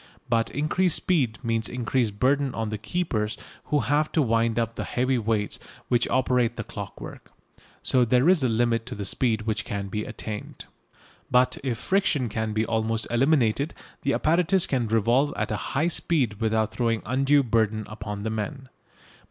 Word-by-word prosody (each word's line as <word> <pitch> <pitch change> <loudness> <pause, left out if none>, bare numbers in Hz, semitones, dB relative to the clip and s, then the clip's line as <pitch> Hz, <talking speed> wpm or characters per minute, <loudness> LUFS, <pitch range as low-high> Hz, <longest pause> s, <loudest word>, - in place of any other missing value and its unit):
But 115 -1 +2
increased 155 +5 +1
speed 130 - +1
means 115 -1 0
increased 120 -3 -1
burden 135 +1 +2
on 110 -1 -2
the 110 -1 -4
keepers 110 -6 -2 0.3
who 145 -1 +1
have 150 +2 +1
to 160 - +3
wind 115 -1 +1
up 115 -1 0
the - - -4
heavy 130 0 0
weights 110 -2 -1 0.3
which 120 -1 +2
operate 125 -2 +2
the - - -4
clockwork. - - -9 0.5
So 130 -1 +3
there 125 +4 +3
is 180 -3 +5
a 130 - +2
limit 115 0 +1
to 125 - -5
the 100 - -4
speed 110 +1 +1
which 110 0 -1
can 100 -1 -4
be 105 +2 -2
attained. 105 -1 -7 0.6
But 125 0 +3
if 125 -4 -1
friction 155 - +1
can 110 0 -2
be 110 +1 0
almost 110 0 -1
eliminated 135 +1 +2 0.3
the 140 - +1
apparatus 175 +3 +2
can 125 -4 0
revolve 115 +6 +2
at - - -2
a - - 0 0.2
high 155 +4 +3
speed 130 -11 0
without 110 -1 +1
throwing 115 0 0
undue 135 +4 +3
burden 110 -2 +1
upon 105 -1 -6
the 110 - -2
men. 130 +5 -4
120 Hz, 170 wpm, -25 LUFS, 110-135 Hz, 0.6 s, is